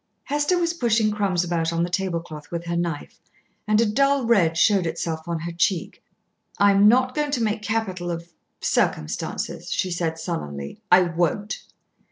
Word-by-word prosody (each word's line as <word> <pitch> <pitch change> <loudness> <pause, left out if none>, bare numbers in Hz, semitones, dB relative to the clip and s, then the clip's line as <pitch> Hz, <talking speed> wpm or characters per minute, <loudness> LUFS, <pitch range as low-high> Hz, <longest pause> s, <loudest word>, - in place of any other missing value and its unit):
Hester 295 +5 +1
was 340 -1 +1
pushing 225 -7 +2
crumbs 195 -4 0
about 170 -1 -1
on 165 0 0
the 175 - -1
tablecloth 170 -5 -3
with 170 0 -4
her 170 0 -2
knife, 170 -3 -3 0.5
and 215 0 +3
a 230 - +4
dull 275 +4 +2
red 180 -9 +3
showed 195 -2 +4
itself 160 0 -3
on 170 -2 -2
her 170 +1 -4
cheek. 170 +1 -1 0.6
"I 200 0 +5
am 200 +1 +5
not 255 +3 +4
going 295 0 -1
to 260 -5 0
make 215 0 -1
capital 205 -5 -2
of 170 0 -6 0.3
circumstances," 75 0 -1
she 185 - -1
said 165 -2 -1
sullenly. 75 - -5
"I 180 +1 +8
won't." 175 +4 -1
180 Hz, 170 wpm, -24 LUFS, 170-220 Hz, 0.6 s, I